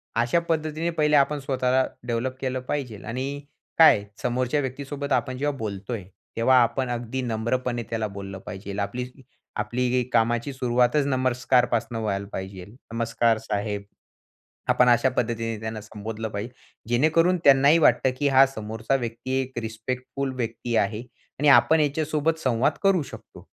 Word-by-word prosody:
अशा 120 +8 +2
पद्धतीने 155 +1 -1
पहिले 150 -2 +2
आपण 145 +1 +3
स्वतःला 130 -1 +1 0.2
डेव्हलप 120 +2 -1
केलं 130 -1 -1
पाहिजेल 125 -8 -4
आणि 135 +5 -4 0.4
काय 160 -11 +7 0.2
समोरच्या 125 +3 0
व्यक्तीसोबत 140 +2 -5
आपण 130 -1 0
जेव्हा 145 0 -1
बोलतोय, 105 0 -5 0.3
तेव्हा 130 +3 +4
आपण 130 +2 -1
अगदी 120 +2 -3
नम्रपणे 120 +1 -1
त्याला 110 -2 -1
बोललं 100 -1 -8
पाहिजेल, 100 +1 -6
आपली 125 +5 -3 0.5
आपली 125 +3 0
कामाची 120 +3 +1
सुरुवातच 125 +2 +2
नमस्कारपासून 125 -2 +1
व्हायला 100 -2 -2
पाहिजेल. 95 +2 -7 0.2
"नमस्कार 115 0 +1
साहेब," 105 -2 -3 0.9
आपण 125 - +4
अशा 120 +2 +4
पद्धतीने 115 -1 -1
त्यांना 110 0 -5
संबोधलं 110 +1 -6
पाहिजे, 105 +4 -5 0.4
जेणेकरून 160 +8 +3
त्यांनाही 140 +3 +6
वाटतं, 135 -4 +4
की 145 - +2
हा 135 0 +6
समोरचा 110 +1 -2
व्यक्ती 120 +2 -3
एक 130 -2 -5
रिस्पेक्टफुल 125 +4 -4
व्यक्ती 115 0 -3
आहे 105 +1 0 0.4
आणि 150 +1 +2
आपण 145 +5 +6
याच्यासोबत 155 +2 0
संवाद 125 -4 +1
करू 195 -4 +3
शकतो. - - -12
125 Hz, 135 wpm, -25 LUFS, 115-135 Hz, 0.9 s, काय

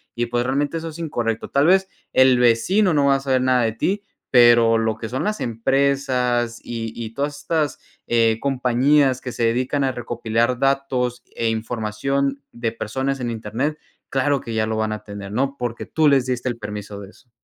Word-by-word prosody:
Y 120 - 0
pues, 120 0 0
realmente 145 +5 0
eso 165 0 -5
es 160 +1 -10
incorrecto. 115 -8 -2
Tal 140 +2 +3
vez 190 +1 +4 0.3
el 130 -1 +5
vecino 160 - +3
no 145 -2 +3
va 140 - +5
a - - 0
saber 130 -2 +1
nada 130 -1 +3
de 110 - +1
ti, 200 - -1 0.3
pero 120 -2 +6
lo 110 -1 0
que 115 - -5
son 130 - -2
las 215 +1 -1
empresas 125 -1 0
y 115 -1 -5
y 115 -2 -6
todas 145 +1 -2
estas, 155 -4 -1 0.3
eh, 115 -1 +3
compañías 135 +1 +2
que 125 - -5
se 115 - -2
dedican 130 +5 0
a 130 - +1
recopilar 120 0 -1
datos 130 -3 0
e 115 -1 0
información 120 +5 -2
de 120 -1 -2
personas 130 +5 -3
en 120 - -2
Internet, 115 +7 -3 0.3
claro 140 +1 +1
que 115 - -6
ya 110 0 0
lo 110 0 -2
van 110 0 -1
a 105 - -7
tener, 100 -1 -8
¿no? 135 +4 -1
Porque 120 -2 -4
tú 155 -1 +2
les 135 -3 +3
diste 125 0 -2
el 120 - -4
permiso 105 -2 -7
de 100 - -10
eso. 120 - -24
125 Hz, 195 wpm, -21 LUFS, 115-140 Hz, 0.3 s, pero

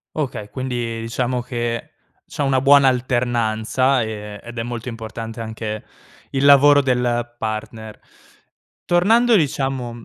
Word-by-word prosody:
Okay, 130 -9 -3
quindi, 120 -2 -4
diciamo, 120 +2 -2
che 120 -1 -4 0.4
c'è - - -4
una 135 -2 +2
buona 140 0 +6
alternanza 120 0 +1
e 105 -2 -6
ed 120 0 -9
è 115 - -1
molto 120 0 -5
importante 115 0 -7
anche 110 -1 -5 0.5
il 135 0 -1
lavoro 145 +1 +7
del 120 -2 -1
partner. 110 0 -5 0.9
Tornando 225 +7 +4
diciamo 135 - -2
120 Hz, 120 wpm, -20 LUFS, 115-135 Hz, 0.9 s, lavoro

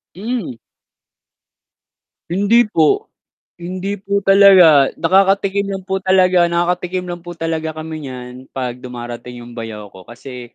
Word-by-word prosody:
Hmm. 210 - -4 1.7
Hindi 205 +6 +3
po. 160 -7 +1 0.5
Hindi 185 +3 -5
po 200 +1 -2
talaga. 185 -8 +6
Nakakatikim 195 +3 +2
lang 195 -1 -5
po 190 +1 -2
talaga 185 -2 +3
nakakatikim 180 +1 -1
lang 175 - -5
po 175 - -7
talaga 160 -1 -3
kami 155 -2 -7
niyan 125 0 -9
'pag 125 -2 -4
dumarating 120 -1 -8
'yong 120 - -12
bayaw 105 -3 -7
ko 95 -1 -15
kasi 120 0 -11
175 Hz, 125 wpm, -17 LUFS, 125-190 Hz, 1.7 s, talaga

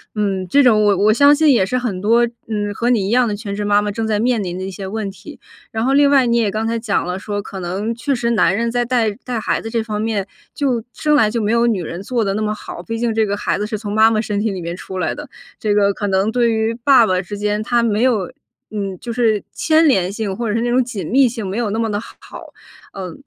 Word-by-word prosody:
嗯， 195 -3 -1
这 285 - +5
种 220 -5 +4
我 205 -2 +3
我 210 +3 +4
相 285 +5 +6
信 305 0 +4
也 210 -6 +3
是 250 +6 -1
很 225 -7 -3
多， 230 +4 +4 0.2
嗯， 205 -2 -2
和 240 +4 0
你 215 -6 +2
一 - - -2
样 250 +2 +3
的 210 - -2
全 200 -2 -6
职 210 - -3
妈 205 0 +3
妈 210 - -2
正 225 +2 -3
在 215 -1 0
面 235 -2 +1
临 180 -1 -4
的 185 - -5
一 - - -4
些 195 0 -7
问 210 +1 -4
题。 195 - -12 0.3
然 225 +1 -2
后 270 - +2
另 285 0 +5
外， 275 -2 +4
你 235 0 +1
也 215 -4 +1
刚 220 +2 -2
才 230 - -1
讲 220 -5 -1
了， 180 +1 -3
说 205 +1 -4
可 195 - -8
能 195 +6 -3
确 275 +5 -1
实 235 -2 -1
男 195 -4 +3
人 235 +2 0
在 245 +1 0
带 240 -2 +1
带 245 -2 -3
孩 - - -1
子 225 - -6
这 230 0 -1
方 215 -1 -4
面 215 -3 -2 0.3
就 255 -6 -1
生 300 -1 +1
来 215 -7 +3
就 235 - -1
没 210 0 0
有 235 0 +3
女 205 -6 0
人 170 +3 -6
做 235 +1 -1
得 195 - 0
那 210 - -2
么 210 0 0
好。 180 -4 -9
毕 225 +6 -4
竟 235 -1 0
这 220 0 +2
个 205 0 -2
孩 - - -1
子 210 - -2
是 215 0 -3
从 205 -1 -5
妈 220 +1 +5
妈 215 - +1
身 210 -2 -2
体 220 0 0
里 185 -2 -5
面 170 +1 -4
出 190 +1 -8
来 180 -4 -1
的， 295 -2 -9 0.3
这 210 -1 0
个 200 -1 +3
可 205 - -3
能 195 +2 +1
对 240 -1 +2
于 220 0 0
爸 260 -4 +6
爸 185 -2 +1
之 200 +3 -7
间， 210 +1 -1
他 235 +1 +1
没 220 -2 +1
有， 225 -8 +1 0.4
嗯， 200 -3 -4
就 235 - -5
是 225 -3 +1
牵 320 0 +3
连 190 -8 +2
性， 205 -2 -3
或 235 +1 -3
者 210 - -1
是 230 - 0
那 240 - 0
种 255 +1 +3
紧 215 -8 -6
密 265 +1 +4
性 225 -3 -5
没 190 +2 -4
有 235 -3 -1
那 210 - -2
么 225 -1 0
得 205 - -1
好。 - - -12 0.8
呃， 185 -3 -6
220 Hz, 305 characters per minute, -18 LUFS, 200-235 Hz, 0.8 s, 相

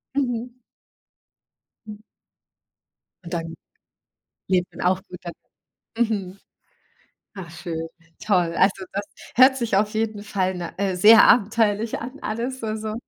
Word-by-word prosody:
Mhm. 245 -3 -2 1.3
Hm. 210 0 -10 1.2
Und 170 - -9
dann 165 -1 -4 0.9
lebt 180 -1 0
man - - -4
auch 185 +1 +2
gut 180 - -10
dann, 175 - -6 0.7
mhm. 195 -3 -4 1.0
Ach 175 -3 -8
schön, 165 -1 -5 0.4
toll. 180 -5 +1
Also, 190 0 +2
das 200 +1 -3 0.3
hört 265 +2 +6
sich 230 -5 0
auf 210 +2 +1
jeden 215 -1 -2
Fall 190 -2 -1
na 175 -2 -6
äh, 195 -2 0
sehr 210 +4 +8
abenteuerlich 220 -1 +2
an 255 +4 -8
alles, 245 +4 -3
so 220 -1 -3
so 215 0 -5
205 Hz, 130 wpm, -23 LUFS, 180-225 Hz, 1.3 s, sehr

